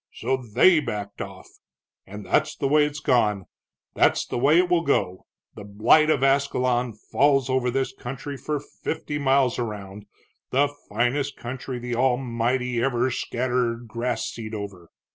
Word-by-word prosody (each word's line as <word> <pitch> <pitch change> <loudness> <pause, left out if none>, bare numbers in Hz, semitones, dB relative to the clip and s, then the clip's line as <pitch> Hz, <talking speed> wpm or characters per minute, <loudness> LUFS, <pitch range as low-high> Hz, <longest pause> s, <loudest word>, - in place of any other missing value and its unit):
So 130 - 0
they 130 - +4
backed 105 -7 -5
off. - - -8 0.6
And 105 +1 -9
that's - - +1
the 140 - -1
way 150 +1 +4
it's 150 0 -4
gone, 105 -9 +1 0.5
that's - - +3
the - - -3
way 145 +6 +4
it 180 +1 +4
will 175 -1 +2
go. 95 - -1 0.3
The - - -10
blight 110 +10 +4
of 145 -4 +2
Ascalon 130 -3 +1 0.2
falls 135 -2 +3
over 130 -1 +1
this 135 +1 -1
country 135 +3 -7
for 145 +3 -3
fifty 145 +1 -5
miles 135 -3 +2
around, 105 -3 -6 0.4
the 140 +2 +2 0.2
finest 125 +6 0
country 125 +1 -6
the 120 0 -5
Almighty 125 -1 0
ever 125 0 +1
scattered 120 -1 -1
grass 115 0 -2
seed 110 -1 -6
over. 100 -5 -8
125 Hz, 150 wpm, -24 LUFS, 115-140 Hz, 0.6 s, they